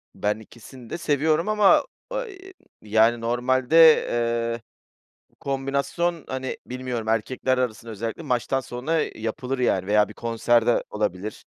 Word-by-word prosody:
Ben 105 +1 -1
ikisini 120 +2 -14
de - - -4
seviyorum 155 +4 +1
ama, 210 - +5 0.4
iii, 385 -2 -12 0.3
yani, 110 +2 +3
normalde, 130 +7 +5
eee, 115 0 -1 0.7
bu - - -33
kombinasyon, 140 +5 -2
hani, 130 0 -4
bilmiyorum, 125 -3 -5
erkekler 130 +4 0
arasında 115 -2 -3
özellikle 115 +9 -5
maçtan 125 0 0
sonra, 135 +6 -2
eee, - - -5
yapılır, 125 +4 -3
yani, 95 -6 +1
veya 105 0 +3
bir - - -10
konserde 115 +1 +1
olabilir. 105 -1 -3
125 Hz, 130 wpm, -24 LUFS, 115-140 Hz, 0.7 s, ama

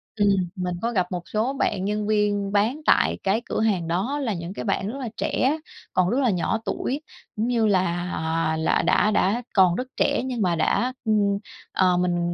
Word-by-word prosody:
ừm, 205 -2 +3 0.3
mình 180 -1 -2
có 235 - 0
gặp 185 -5 0
một 175 -1 -3
số 225 +5 0
bạn 195 -8 -1
nhân 210 0 -1
viên 205 -2 +1
bán 220 +9 +1
tại - - +3
cái 200 +4 +1
cửa - - -2
hàng 190 -7 +1
đó. 200 +13 -1
Là 220 -5 0
những 170 +1 -5
cái - - -6
bạn 195 -1 0
rất 275 +5 -6
là 245 -4 -4
trẻ 285 +5 +1 0.4
còn 185 0 +2
rất 250 - +1
là 260 -3 +3
nhỏ 190 +4 0
tuổi, 275 +4 -2 0.3
cũng 220 +3 -1
như 230 -3 +2
là, 180 -3 +1
ờ, 160 0 -1
là 160 - +2
đã 215 - +3
đã 210 +4 +1
còn 185 -3 +5
rất 250 +4 -3
trẻ, - - +2
nhưng 250 -3 -3
mà 180 -3 +2
đã 240 +10 +1
ừm, 205 -2 +2 0.4
ờ, 180 -2 +3
mình 175 -1 0
205 Hz, 210 wpm, -24 LUFS, 180-225 Hz, 0.4 s, còn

